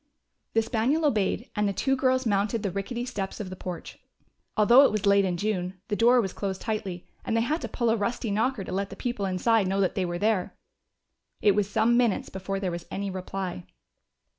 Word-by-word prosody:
The 225 - +4
spaniel 255 +8 +1
obeyed, 225 -3 0
and 210 -1 +1
the - - -2
two 270 +7 +1
girls 260 0 +1
mounted 205 +1 +1
the 200 - -1
rickety 235 +6 -3
steps 200 -6 -4
of 195 -3 -5
the - - -5
porch. 180 -2 -7 0.6
Although 235 +6 +7
it - - +4
was 210 -2 -1
late 200 0 +5
in 180 -2 -1
June, 185 -2 -2
the 210 - 0
door 240 +3 +5
was 195 -5 -1
closed 190 -2 -3
tightly, 205 -6 -4 0.2
and 225 - 0
they - - +3
had 300 +8 0
to - - -3
pull 235 -3 0
a - - +3
rusty 225 +1 -2
knocker 220 +1 0
to - - -7
let 195 +1 -1
the - - -8
people 240 -5 -2
inside 195 +3 +2
know 195 +1 0
that 190 -2 +2
they 190 - -1
were 175 0 -3
there. 210 -1 0 0.8
It 205 - +5
was 205 0 0
some 235 +3 +3
minutes 240 -5 +1
before 195 +1 -4
there 190 -2 -2
was 170 0 -6
any 200 0 -3
reply. 185 - -5
205 Hz, 215 wpm, -27 LUFS, 190-230 Hz, 0.8 s, Although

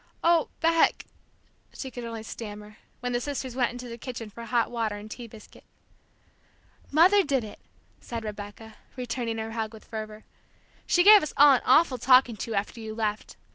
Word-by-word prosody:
"Oh, 335 -1 +3
Beck!" 330 0 +3 0.7
she 265 - -6
could 245 - -7
only 230 -1 -6
stammer, 210 -1 -9 0.2
when 245 0 -2
the 240 - 0
sisters 265 -2 -4
went 245 -2 +1
into 245 0 -8
the 235 0 -8
kitchen 235 -3 -7
for 235 +3 -9
hot 235 0 0
water 225 -3 -2
and 210 +1 -10
tea 240 +1 -8
biscuit. 220 -1 -15 1.3
"Mother 365 +7 +5
did 275 -6 0
it," 210 - -10 0.4
said 230 -2 -6
Rebecca, 210 +1 -8 0.2
returning 240 -2 -3
her 220 0 -4
hug 220 -1 -4
with 215 - -15
fervor. 215 -1 -7 0.6
"She 355 - +4
gave 420 +1 +9
us 305 - -5
all 290 0 +8
an 255 - +2
awful 260 -1 +4
talking 255 -1 +5
to, 225 +2 -4
after 200 +3 -3
you 220 -1 -7
left! 215 -1 -3
235 Hz, 175 wpm, -27 LUFS, 220-260 Hz, 1.3 s, gave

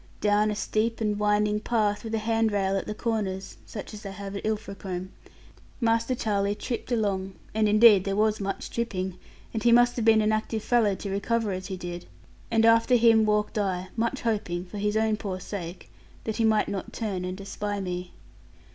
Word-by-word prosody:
Down 210 +1 +3
a 210 - -1
steep 220 +2 -1
and 210 -2 0
winding 210 0 +2
path, 210 -2 0
with 225 -1 -3
a - - +1
handrail 215 -3 +1
at 195 - -2
the 210 - -4
corners 205 -5 -3
(such 210 0 -7
as 210 - -8
they 200 - -6
have 200 0 -7
at 200 - -5
Ilfracombe), 195 -4 -4 0.7
Master 230 +1 +1
Charlie 205 -3 0
tripped 240 +3 -5
along 195 -4 -1 0.2
and 215 -1 +2
indeed 210 -2 +7
there 195 0 -1
was 215 +1 +2
much 195 -1 -4
tripping, 190 -6 -3 0.3
and 220 - -2
he 235 - +4
must 245 +1 +5
have 235 - 0
been 220 -1 +5
an 215 - +2
active 215 0 -1
fellow 225 -5 +3
to 195 +1 -5
recover 215 +2 0
as 185 0 -4
he 190 -2 -4
did 175 -1 -7 0.4
and 225 -1 +3
after 230 +2 +5
him 225 -2 +5
walked 210 0 +1
I, 185 -2 -1
much 230 0 -1
hoping 195 -6 -1
(for 200 +3 -7
his 210 +1 0
own 220 -1 +2
poor 195 -4 -4
sake) 180 -2 -7 0.3
that 220 - -3
he 225 - +2
might 215 -1 +3
not 195 -2 -5
turn 200 -5 -3
and 185 +1 -4
espy 205 +1 -4
me. 180 -1 -4
210 Hz, 195 wpm, -27 LUFS, 195-225 Hz, 0.7 s, indeed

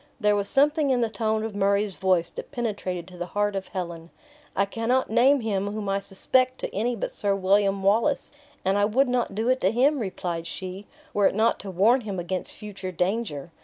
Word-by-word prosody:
There 210 -2 +3
was 200 -1 -1
something 295 +1 +3
in 250 -2 +2
the 230 -2 0
tone 220 0 0
of 220 -1 -4
Murray's 200 0 +1
voice 185 -3 +1
that - - -8
penetrated 200 -9 -3
to 180 -1 -13
the 175 - -3
heart 205 -1 +1
of 190 -1 -3
Helen. 170 -3 -6 0.5
"I 195 - +3
cannot 230 +4 0
name 265 +4 +5
him 205 -2 -1
whom 210 -1 -4
I 195 0 +1
suspect 255 +7 +1
to - - -4
any 235 +5 0
but 220 - -3
Sir 200 -1 0
William 195 0 +2
Wallace; 225 +9 +2 0.3
and 195 +2 +2
I 205 - +4
would 255 +6 +2
not 245 -5 -1
do 220 +3 -1
it 255 0 +3
to 190 - +4
him," 270 +5 +3
replied 175 -5 -3
she, 190 +2 -6 0.3
"were 205 -1 +4
it - - -1
not 220 +2 +2
to 195 - -7
warn 215 +8 +4
him 205 -4 -5
against 180 +1 -4
future 200 -3 -7
danger. 180 -4 -2
205 Hz, 210 wpm, -25 LUFS, 190-235 Hz, 0.5 s, name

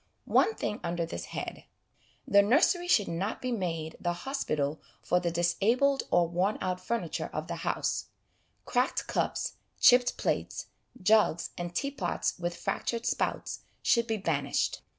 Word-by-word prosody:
One 445 - +5
thing 210 - -3
under 170 0 -1
this 85 - -6
head: - - -6 0.6
the 200 - +6
nursery 320 - +3
should 210 - +4
not 185 +6 -2
be 255 - -3
made 165 -7 -3
the 175 -1 0
hospital 155 - -1 0.2
for 180 - +2
the 175 -1 -1
disabled 215 +11 +2
or 175 -1 +4
worn 180 +5 0
out 185 -1 -2
furniture 185 -7 -2
of 155 - -3
the 170 0 -5
house; - - -1 0.6
cracked 250 +1 +1
cups, - - -1 0.2
chipped 245 0 +6
plates, - - -1 0.4
jugs 210 -5 +3
and 175 0 -5
teapots 275 -11 -1
with 175 0 -3
fractured 235 0 -2
spouts, - - -1 0.2
should 235 -3 +3
be 225 - 0
banished. 145 -8 0
185 Hz, 145 wpm, -30 LUFS, 170-235 Hz, 0.6 s, the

